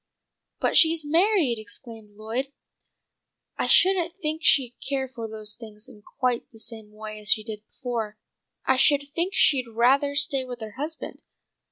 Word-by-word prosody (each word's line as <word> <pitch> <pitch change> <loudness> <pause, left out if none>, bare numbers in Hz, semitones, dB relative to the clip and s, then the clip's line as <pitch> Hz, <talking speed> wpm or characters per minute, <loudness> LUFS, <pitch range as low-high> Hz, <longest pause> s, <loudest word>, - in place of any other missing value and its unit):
"But - - 0
she's 325 -1 +6
married!" 325 - +2
exclaimed 215 0 -9
Lloyd. 235 +6 -3 1.0
"I - - -1
shouldn't 355 -2 +4
think 310 -2 -1
she'd 255 -6 +4
care 270 -1 -2
for 240 -3 -7
those 215 -1 -6
things 215 -2 -9
in 210 - -15
quite 245 +2 -2
the 225 - -16
same 220 -1 -8
way 215 0 -8
as 210 - -5
she 215 - +4
did 215 -1 -7
before. 230 -5 -5 0.5
I 265 - +3
should 285 +2 +4
think 345 +4 -1
she'd 260 -5 +3
rather 265 +5 +2
stay 280 -2 +2
with 250 -1 -8
her 220 -1 -6
husband." 300 +7 -7
250 Hz, 160 wpm, -25 LUFS, 220-290 Hz, 1.0 s, she's